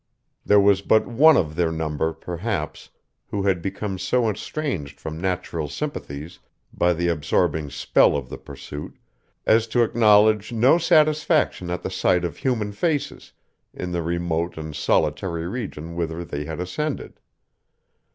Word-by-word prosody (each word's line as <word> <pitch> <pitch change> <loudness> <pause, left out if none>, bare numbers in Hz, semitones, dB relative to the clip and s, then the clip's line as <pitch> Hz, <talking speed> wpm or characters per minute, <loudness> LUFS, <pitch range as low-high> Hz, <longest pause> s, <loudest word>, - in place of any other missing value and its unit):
There 105 - +5
was 100 -1 +4
but 110 +2 +3
one 145 +6 +5
of 80 -2 0
their 85 -1 +1
number, 80 0 -1
perhaps, 90 0 -4 0.4
who 100 -1 -3
had 95 -3 +1
become 95 +1 -4
so 125 +2 +1
estranged 95 - -4
from 80 +1 -6
natural 90 -4 -2
sympathies, 80 - -6 0.3
by 90 0 +2
the 85 +1 -1
absorbing 80 -1 0
spell 70 0 +3
of 70 -3 -5
the - - -8
pursuit, 70 +1 -9 0.5
as 110 +1 +4
to 120 +1 +2
acknowledge 110 -1 +4
no 120 +8 +4
satisfaction 155 - +2
at 90 0 -3
the - - -3
sight 90 -1 +2
of 80 -4 -5
human 110 -6 -1
faces, 145 +7 -2 0.4
in 90 - -5
the 85 -1 -1
remote 85 0 -2
and 80 -1 -6
solitary 80 +3 0
region 90 -7 -5
whither 85 0 -3
they 75 -1 -5
had 80 +2 -6
ascended. 140 +12 -4
90 Hz, 145 wpm, -23 LUFS, 80-110 Hz, 0.5 s, There